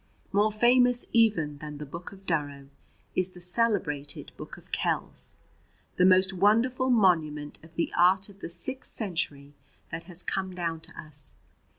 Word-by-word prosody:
More 205 +2 +3
famous 245 +3 +4
even 170 -11 +3
than 150 0 -7
the 150 - -6
"Book 170 +5 -8
of 195 -1 -15
Durrow" 145 -5 -2 0.5
is 185 0 +1
the 180 - -12
celebrated 180 -7 0
"Book - - -9
of - - -16
Kells," - - -2 0.6
the 180 - +5
most 190 +1 +5
wonderful 230 +7 +3
monument 160 -10 +2
of 160 +1 -17
the 170 - -1
art 185 +2 +4
of 200 -1 -16
the - - -6
Sixth 255 +10 -1
Century 145 -8 -3 0.4
that 165 - -5
has 180 0 -2
come 190 -1 -3
down 165 -2 -2
to - - -12
us. 150 -4 -7
180 Hz, 160 wpm, -28 LUFS, 155-205 Hz, 0.6 s, the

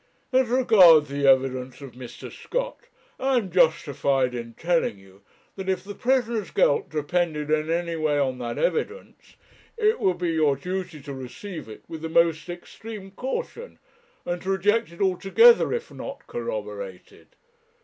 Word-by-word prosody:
'As 260 -1 +4
regards 190 - +6
the 140 0 0
evidence 130 -1 +2
of 140 -3 -9
Mr. 125 -1 -10
Scott, - - -4 0.3
I 265 0 +2
am 200 -6 -2
justified 140 -6 +2
in 115 -1 -6
telling 170 - 0
you, 95 0 -19 0.3
that 190 -1 -5
if 185 -1 -1
the 205 +1 -7
prisoner's 235 -4 0
guilt 140 - +2
depended 155 0 -1
in 155 0 +1
any 170 0 -1
way 155 -2 0
on 130 -3 0
that 120 -1 -4
evidence, 430 - -3 0.4
it 435 0 +2
would 185 -2 +1
be 175 -1 -1
your 155 -3 +2
duty 180 +1 -5
to 140 0 -7
receive 135 - -8
it 110 - -11
with 160 -1 -8
the 160 - -4
most 165 0 +2
extreme 195 +3 -9
caution, 470 - -5 0.5
and 175 0 -3
to 190 - -5
reject 205 +2 +1
it 170 - -10
altogether 195 - +5
if 470 0 -3
not - - -8
corroborated. - - -7
175 Hz, 155 wpm, -25 LUFS, 145-220 Hz, 0.5 s, regards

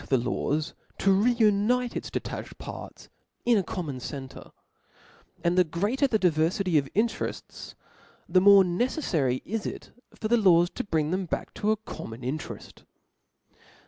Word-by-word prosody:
the 135 - +4
laws 150 +6 -1 0.2
to 195 - +3
reunite 230 +2 +2
its - - -4
detached - - -5
parts - - -9 0.4
in 240 -1 +4
a 205 - +3
common 160 -8 -5
center; 135 +1 -8 0.9
and 170 0 +2
the 180 - +6
greater 205 - 0
the 225 - +2
diverfity 175 -1 +2
of 135 -1 -5
interefts, 225 +3 -3 0.5
the 185 +2 +4
more 200 0 +8
neceflary 175 - 0
it 220 +1 -3
is - - -7 0.2
for 215 - -3
the 240 +2 +4
laws 175 -5 +4
to 255 - -4
bring 160 -7 0
them 185 0 -1
back - - -4
to 210 - -1
a 220 - +3
common 115 - -8
intereft. 135 +5 -6
185 Hz, 145 wpm, -27 LUFS, 155-215 Hz, 0.9 s, more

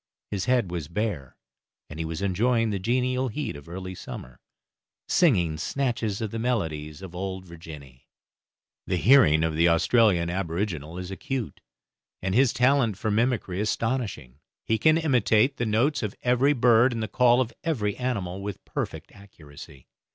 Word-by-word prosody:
His 100 -3 -2
head 125 -7 +1
was 85 -4 -4
bare, 85 - -3 0.5
and 75 - -9
he 80 - -2
was 80 +3 -4
enjoying 115 +4 +1
the 100 - -2
genial 125 +5 0
heat 145 - -4
of 70 +2 -12
early 95 +1 -6
summer, 65 -7 -9 0.7
singing 90 - +2
snatches 115 -4 -2
of 110 -2 -3
the 115 - -4
melodies 80 -9 -2
of 90 -2 -9
Old 95 0 -5
Virginny. 75 -6 -12 0.8
The 90 - 0
hearing 90 - +5
of 80 -1 0
the 85 +2 +4
Australian 85 0 +3
aboriginal 85 -3 -3
is 90 +1 -6
acute, 125 +4 -5 0.6
and 95 0 -2
his 125 +2 +4
talent 125 -5 +2
for 110 +1 -2
mimicry 110 -4 0
astonishing; 105 - -2 0.3
he 110 0 +1
can 155 0 +4
imitate 130 -4 +2
the 120 - -1
notes 125 +8 +1
of 105 -3 -4
every 125 +4 +3
bird 120 -1 +4
and 115 -1 -3
the - - -2
call 120 +3 +4
of 120 -2 -1
every 110 - -1
animal 100 -8 -3
with 100 -1 -6
perfect - - -5
accuracy. 75 -9 -14
105 Hz, 160 wpm, -26 LUFS, 85-125 Hz, 0.8 s, hearing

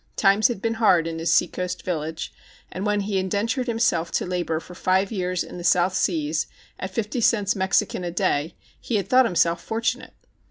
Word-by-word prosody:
Times 200 +3 +4
had 235 -6 -5
been 230 0 +1
hard 180 -7 +5
in 165 0 -4
his 165 - 0
seacoast 180 0 0
village, 160 -2 -4 0.4
and 190 +3 -3
when 205 0 +1
he 200 -1 -1
indentured 215 +7 -1
himself 225 -8 +1
to - - 0
labor 175 -3 -1
for 180 - -12
five 190 +2 +1
years 180 -3 -1
in - - -9
the - - -7
South 180 +1 +3
Seas 155 -4 0 0.3
at 185 - -4
fifty 215 +5 -2
cents 205 -3 +2
Mexican 190 0 +1
a 175 - -2
day, 165 -2 0 0.2
he 235 - -3
had 200 -3 0
thought 255 +4 +5
himself 170 -4 +1
fortunate. 230 +3 -2
185 Hz, 190 wpm, -24 LUFS, 170-210 Hz, 0.4 s, hard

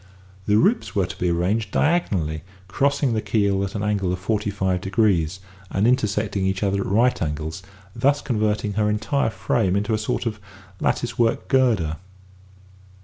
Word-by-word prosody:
The 105 0 +4
ribs 210 - +2
were 100 -3 +2
to 90 - -7
be 90 - +1
arranged 90 +6 0
diagonally 95 - 0 0.3
crossing 140 +5 +1
the 110 - 0
keel 100 -3 +1
at 100 +1 -4
an 105 - -2
angle 100 -3 0
of 90 - -1
forty 105 +2 -1
five 95 -2 -1
degrees, 95 -4 +1 0.3
and 95 +3 0
intersecting 105 -4 +1
each 95 +1 0
other 100 0 +1
at - - -3
right 120 +6 +2
angles, 80 +3 -3 0.3
thus 140 +5 +2
converting 105 -4 -1
her 105 +1 +1
entire 110 +6 0
frame 100 -4 0
into 105 +3 0
a 110 - +1
sort 110 - -2
of 110 -2 -3 0.4
lattice 120 - -1
work 115 -1 +1
girder. 110 - +2
105 Hz, 165 wpm, -23 LUFS, 95-115 Hz, 0.4 s, The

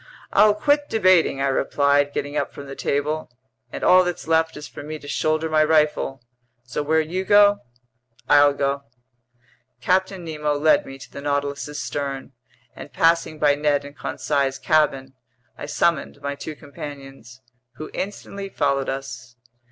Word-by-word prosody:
"I'll 210 0 +5
quit 290 +6 +1
debating," 185 -10 +3
I - - +2
replied, 140 +1 +2
getting 145 +1 -4
up - - -1
from 140 - -10
the 135 0 -8
table. 150 +2 -2 0.4
"And - - -6
all 185 0 +6
that's 175 -2 -4
left 160 0 +1
is 150 - -8
for - - -10
me 155 +2 -6
to 145 - -13
shoulder 155 +2 0
my 155 -1 +3
rifle. 150 -4 +1 0.4
So 125 +4 -4
where 155 +2 +2
you 175 +4 -3
go, 205 +1 +5 0.7
I'll 145 0 +5
go." 140 0 -1 1.0
Captain 185 -1 0
Nemo 150 -2 -2
led 155 +2 +3
me 135 - -9
to 135 - -13
the - - -8
Nautilus's 145 +1 -2
stern, 140 -2 -4 0.4
and - - -10
passing 165 -1 +2
by 150 -1 +3
Ned 145 -1 0
and 145 0 -11
Conseil's 140 -3 -1
cabin, 135 -4 +1 0.4
I - - -7
summoned 170 0 0
my 140 0 -3
two 150 +2 -7
companions, 135 -4 -10 0.3
who 155 +5 -9
instantly 200 0 -5
followed 140 -5 0
us. 130 -2 -6
145 Hz, 155 wpm, -22 LUFS, 140-160 Hz, 1.0 s, all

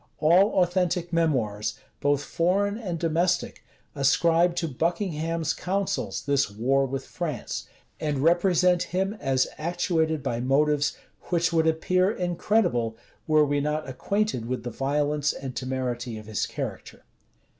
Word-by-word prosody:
All 180 +5 +4
authentic 175 -1 -1
memoirs, 110 -11 0 0.2
both 145 0 +1
foreign 195 +6 +1
and 195 -7 -4
domestic, 170 +2 0 0.3
ascribe 165 +5 +3
to 170 -1 -1
Buckingham's 165 +1 -1
counsels 195 +1 -2
this 140 -5 +2
war 130 +6 +1
with 135 +1 -4
France, 155 -8 -4 0.3
and 150 -2 -1
represent 175 +3 +3
him 190 +3 -1
as 135 -2 +2
actuated 160 -2 0
by 115 - -1
motives 145 +3 +2 0.3
which 175 0 +1
would 160 -1 +3
appear 185 +4 +2
incredible, 175 - 0 0.3
were 155 -1 +5
we 145 0 0
not 150 +1 -2
acquainted 195 - -1
with 125 -1 -3
the 120 - -4
violence 145 +3 0
and 130 -2 -7
temerity 125 -3 -3
of 110 - -10
his 110 -3 -2
character. - - -6
155 Hz, 130 wpm, -26 LUFS, 135-175 Hz, 0.3 s, were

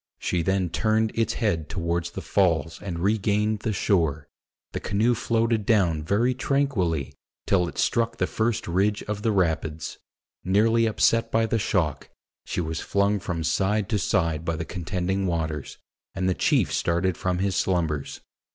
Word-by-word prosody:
She 90 - -1
then 95 0 0
turned 110 0 +1
its 115 -2 0
head 85 -10 -1
toward 85 0 -1
the 85 - -6
Falls 85 -5 +1
and 90 -4 -4
regained 105 +3 +1
the 110 - -2
shore. 80 -8 +1 0.4
The - - -3
canoe 110 +5 +1
floated 115 -1 +1
down 90 -8 +2
very 105 +10 +1
tranquilly 115 - 0 0.3
till 90 -3 +2
it - - -8
struck 115 -1 +1
the - - +1
first 110 0 -1
ridge 100 +4 +1
of 105 -1 -4
the 110 - +1
rapids. 80 -5 -1 0.4
Nearly 110 +5 +3
upset 115 +1 +2
by 115 0 +3
the 115 0 0
shock, 85 -8 -1 0.4
she - - -2
was 80 -1 -3
flung 100 +1 +1
from 85 -3 -3
side 100 +4 +1
to 105 -3 +1
side 80 -4 0
by 85 -1 -1
the 80 +1 -4
contending 90 +3 -2
waters, 80 -4 -3 0.4
and 95 -1 -1
the 95 - +3
chief - - +1
started 85 +1 +1
from 90 +1 -1
his 95 0 0
slumbers. 80 -7 -1
95 Hz, 160 wpm, -25 LUFS, 85-110 Hz, 0.4 s, Nearly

